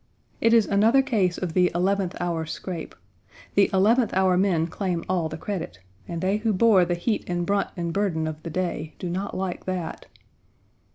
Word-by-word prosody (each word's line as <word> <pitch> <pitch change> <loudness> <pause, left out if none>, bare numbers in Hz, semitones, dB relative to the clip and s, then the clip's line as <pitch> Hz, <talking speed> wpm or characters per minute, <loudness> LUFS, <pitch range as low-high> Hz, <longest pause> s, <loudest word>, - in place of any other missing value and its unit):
It 230 - +3
is 230 -2 +5
another 225 +7 +4
case 195 -9 +1
of 175 -3 -3
the 180 0 +4
eleventh 190 +1 0
hour 170 -2 -2
scrape; 170 0 -6 0.6
the 200 - +4
eleventh 215 +5 +3
hour 190 -1 +3
men 180 -3 +2
claim 175 0 -3
all 175 -4 0
the 155 - -6
credit, 160 - -5 0.3
and 170 -1 -4
they 195 +2 +1
who 220 0 0
bore 195 -2 +5
the 175 - -1
heat 210 +5 -1
and 175 -1 -1
brunt 200 +2 0
and 170 -1 -2
burden 180 -5 0
of 155 0 -5
the 165 - -6
day 165 -3 -3
do 180 - -4
not 190 +3 -3
like 185 -2 -4
that. 185 -3 -4
185 Hz, 185 wpm, -25 LUFS, 170-200 Hz, 0.6 s, is